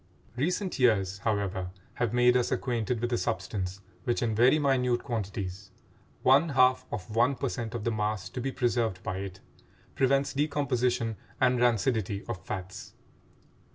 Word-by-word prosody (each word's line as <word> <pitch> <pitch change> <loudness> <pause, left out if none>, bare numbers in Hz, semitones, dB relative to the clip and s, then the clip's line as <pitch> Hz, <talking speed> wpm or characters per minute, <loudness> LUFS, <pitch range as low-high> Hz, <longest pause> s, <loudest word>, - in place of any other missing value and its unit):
Recent 180 +6 -1
years, 100 -6 +2
however, 100 -4 -1 0.3
have 120 -3 +2
made 125 0 +4
us 125 -1 +2
acquainted 120 -1 -1
with 120 +1 -1
a - - +1
substance 95 +1 -3 0.2
which 120 +3 0
in 115 -2 0
very 125 +7 +5
minute 125 -4 +1
quantities—one 100 - -1
half 130 -2 +3
of 105 +2 -5
one 120 +4 +3
per 135 +1 -2
cent 115 -2 -4
of 115 - -3
the 115 - 0
mass 105 -3 -1
to 125 - -5
be 135 +2 -2
preserved 120 -7 0
by 95 - -3
it—prevents 130 +8 -2
decomposition 125 -6 0 0.2
and 125 -1 +3
rancidity 110 -4 +1
of 105 -8 -5
fats. 95 -1 -6
120 Hz, 145 wpm, -29 LUFS, 100-125 Hz, 0.3 s, very